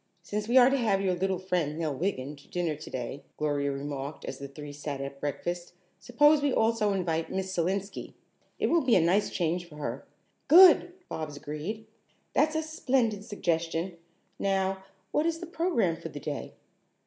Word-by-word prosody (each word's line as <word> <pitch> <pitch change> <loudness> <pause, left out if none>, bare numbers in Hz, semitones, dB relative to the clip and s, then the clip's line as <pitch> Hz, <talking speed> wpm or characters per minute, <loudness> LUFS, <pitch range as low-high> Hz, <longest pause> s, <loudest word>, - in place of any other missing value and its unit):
"Since 210 +4 -3
we 245 +3 +4
are 255 +1 +8
to 275 - +3
have 215 -6 +2
your 190 -2 +1
little 190 +1 0
friend, 175 -5 -1
Nell 160 -3 -1
Wiggin, 145 -4 -2
to 140 - -18
dinner 175 -3 -1
today," 135 -2 -6
Gloria 145 -2 0
remarked 140 +1 -5
as - - -6
the 140 - -6
three 145 +1 -9
sat 145 -1 -5
at 140 0 -6
breakfast, 175 +5 -3 0.3
"suppose 295 +5 +4
we 285 -1 +2
also 220 -3 +2
invite 165 -4 -1
Miss 190 0 -2
Selenski. 195 +3 -2 0.4
It - - 0
will 335 0 +4
be 255 -5 +3
a - - +6
nice 180 +5 +3
change 175 0 -1
for 150 - -13
her." 150 - -5 0.4
"Good!" 355 +1 +8
Bobs 150 -2 -5
agreed. 155 +10 -5 0.5
"That's 310 +1 +3
a 315 - +1
splendid 255 -9 0
suggestion. 170 -4 -1 0.4
Now 190 -1 0 0.3
what 305 +2 +2
is 330 -1 0
the 350 - -6
program 325 - +1
for 165 0 -7
the 145 - -7
day?" 145 -1 -5
180 Hz, 175 wpm, -29 LUFS, 150-225 Hz, 0.5 s, are